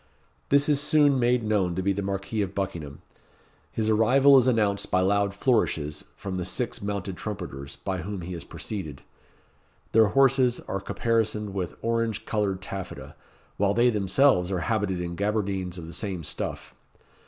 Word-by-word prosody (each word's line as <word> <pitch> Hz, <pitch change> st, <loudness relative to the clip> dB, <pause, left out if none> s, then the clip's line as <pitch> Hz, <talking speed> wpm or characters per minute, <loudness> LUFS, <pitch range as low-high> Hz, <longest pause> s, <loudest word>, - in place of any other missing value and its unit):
This 140 Hz, 0 st, +4 dB
is 145 Hz, -2 st, +3 dB
soon 145 Hz, -3 st, +4 dB
made 120 Hz, 0 st, +2 dB
known 100 Hz, -5 st, +1 dB
to 95 Hz, -, -2 dB
be 100 Hz, +1 st, +2 dB
the 100 Hz, -, -3 dB
Marquis 100 Hz, +2 st, -2 dB
of 100 Hz, -1 st, -3 dB
Buckingham. 85 Hz, -8 st, -4 dB, 0.7 s
His 110 Hz, -1 st, -1 dB
arrival 130 Hz, +6 st, +5 dB
is 130 Hz, -2 st, +5 dB
announced 105 Hz, -5 st, +1 dB
by 95 Hz, -, +2 dB
loud 100 Hz, +1 st, +1 dB
flourishes 80 Hz, -, 0 dB
from 95 Hz, -2 st, -5 dB
the 90 Hz, -, -2 dB
six 115 Hz, +7 st, -3 dB
mounted 100 Hz, -2 st, -3 dB
trumpeters 85 Hz, -10 st, -6 dB
by 95 Hz, -2 st, -4 dB
whom 100 Hz, +1 st, -5 dB
he 90 Hz, +2 st, -6 dB
is 85 Hz, -, -6 dB
preceded. 80 Hz, -10 st, -6 dB, 0.9 s
Their 110 Hz, -1 st, +5 dB
horses 130 Hz, +1 st, +3 dB
are 95 Hz, -, -4 dB
caparisoned 110 Hz, -3 st, -1 dB
with 95 Hz, -3 st, -4 dB
orange 115 Hz, -2 st, -1 dB
coloured 100 Hz, -4 st, -1 dB
taffeta, 95 Hz, -1 st, -7 dB, 0.4 s
while 100 Hz, 0 st, +2 dB
they 120 Hz, +1 st, +4 dB
themselves 100 Hz, -1 st, +3 dB
are 90 Hz, -2 st, -1 dB
habited 105 Hz, -5 st, -1 dB
in 85 Hz, 0 st, -4 dB
gaberdines 95 Hz, -3 st, -1 dB
of 85 Hz, -, -7 dB
the 85 Hz, -, -9 dB
same 95 Hz, -5 st, -3 dB
stuff. 75 Hz, -, -4 dB
100 Hz, 165 wpm, -26 LUFS, 95-115 Hz, 0.9 s, arrival